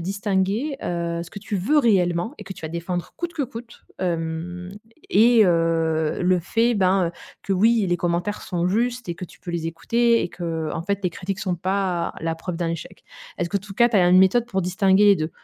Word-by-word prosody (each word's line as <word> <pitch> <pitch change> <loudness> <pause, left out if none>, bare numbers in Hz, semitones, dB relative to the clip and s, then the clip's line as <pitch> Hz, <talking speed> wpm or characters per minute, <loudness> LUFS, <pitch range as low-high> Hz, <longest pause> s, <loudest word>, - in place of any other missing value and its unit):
distinguer, 200 - -1
heu, 170 -1 -2
ce 170 - -11
que - - -8
tu 205 - -6
veux 210 +11 +2
réellement 190 -3 +2
et - - -9
que 195 -1 -7
tu 185 - -14
vas 160 - -4
défendre, 170 +1 -4
coûte 345 0 -4
que 300 - -2
coûte, 235 -2 -9 0.2
hem 175 +1 -3 0.4
et 225 +2 +5
heu, 165 -3 +1
le 180 0 +2
fait, 230 +7 +1
ben, 185 -2 +3
heu, - - -22 0.3
que 195 - -1
oui 215 +2 +3
les 175 - +2
commentaires 175 +4 -2
sont 175 -2 -2
justes 240 +4 -1
et 170 - -2
que 180 - -7
tu - - -16
peux 175 - -7
les 165 -1 -2
écouter 235 +7 +2
et - - -3
que, 175 - -11
heu, 160 -2 -2
en 165 - -3
fait 200 +2 -1
les 180 - +1
critiques 190 +3 -5
sont 190 -2 -1
pas 185 -1 -1
la 165 0 -1
preuve 165 +1 -5
d'un 170 -1 -1
échec. 165 -2 -7 0.3
Est-ce 175 - -1
que 200 - -1
tout 200 +1 -6
cas, 235 +4 +4
tu 235 - -6
as 180 -2 +5
une 185 +1 +6
méthode 195 +6 +4
pour 190 -6 -1
distinguer 190 +2 +3
les 205 -1 +7
2? 155 -1 -3
185 Hz, 230 wpm, -23 LUFS, 170-210 Hz, 0.4 s, les